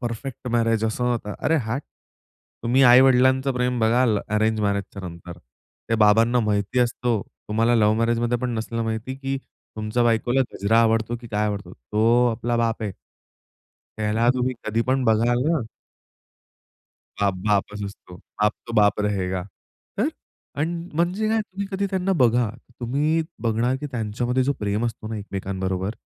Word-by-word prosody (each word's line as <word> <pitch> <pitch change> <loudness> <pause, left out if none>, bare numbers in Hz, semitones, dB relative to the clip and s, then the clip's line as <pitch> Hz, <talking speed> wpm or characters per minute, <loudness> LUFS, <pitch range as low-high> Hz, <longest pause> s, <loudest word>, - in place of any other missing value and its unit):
Perfect 125 +1 -5
marriage 115 -2 +1
असं 110 +3 -1
नव्हतं. 115 -4 -1
अरे 160 - +1
हट! 120 +6 -3 0.8
तुम्ही 125 +3 +3
आई-वडिलांचं 130 +1 +6
प्रेम 125 0 0
बघाल, 115 -1 +3
अरेंज 110 +1 +1
मॅरेजच्या 100 -1 -2
नंतर, 85 +1 -10 0.5
ते 115 - +2
बाबांना 115 +4 +4
माहिती 105 +2 0
असतो. 120 -2 0 0.3
तुम्हाला 115 +3 +2
लव्ह 105 -1 +4
मॅरेजमध्ये 120 +1 +1
पण 125 0 -2
नसलं 115 +1 -3
माहिती, 110 +3 -3
की 135 0 -3 0.4
तुमच्या 110 +3 0
बायकोला 120 +3 +2
गजरा 110 +3 +2
आवडतो 115 +1 +1
की 120 - -10
काय 105 0 0
आवडतो. 100 -1 -4
तो 115 - +2
आपला 120 +1 -1
बाप 115 -1 0
आहे. 100 -3 -2 1.1
त्याला 110 +2 +1
तुम्ही 125 0 0
कधी 110 +2 0
पण 130 0 +1
बघाल 120 +3 +3
ना 165 -3 +2 1.6
बाप 100 -2 +2
बापच 105 0 0
असतो. 95 -2 -10 0.3
बाप 105 0 +4
तो 115 - -7
बाप 105 -1 +4
रहेगा. 95 -3 -1 0.6
तर - - +2 0.5
अन् 170 +2 -2
म्हणजे 180 +6 +1
काय, 220 0 +2
तुम्ही 200 -1 -5
कधी 200 +1 0
त्यांना 190 0 0
बघा, 120 -1 +3 0.3
तुम्ही 150 +7 +1 0.2
बघणार 115 +3 +1
की 150 - -3
त्यांच्यामध्ये 120 +2 -1
जो 140 - +2
प्रेम 105 +2 -1
असतो 110 -1 -6
ना 115 - -4
एकमेकांबरोबर, 95 0 -3
115 Hz, 150 wpm, -23 LUFS, 105-125 Hz, 1.6 s, आई-वडिलांचं